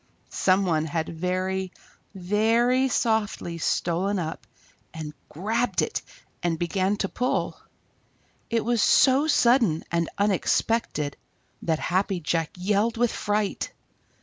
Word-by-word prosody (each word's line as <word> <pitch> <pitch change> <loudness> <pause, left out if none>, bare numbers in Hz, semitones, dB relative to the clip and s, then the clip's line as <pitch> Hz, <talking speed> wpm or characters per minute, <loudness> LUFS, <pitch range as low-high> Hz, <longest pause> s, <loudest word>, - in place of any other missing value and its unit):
Some 190 +1 +2
one 160 -3 +1
had 160 0 -2
very, 185 +2 -2 0.4
very 225 +7 +2
softly 220 -8 0
stolen 180 +5 0
up 160 -3 -5 0.5
and 155 -2 -6 0.2
grabbed 225 +9 0
it - - -2 0.4
and 170 -2 0
begun 190 +4 0
to 195 - -1
pull. 250 +6 -1 0.9
It 230 -2 0
was 235 -2 +2
so 270 +3 +5
sudden 235 - +3
and 170 -1 0
unexpected 200 -5 0 0.4
that 160 -2 0
Happy 185 +2 0
Jack 165 0 -1
yelled 210 +5 +1
with 240 0 +2
fright. 210 -1 -2
195 Hz, 115 wpm, -25 LUFS, 170-225 Hz, 0.9 s, so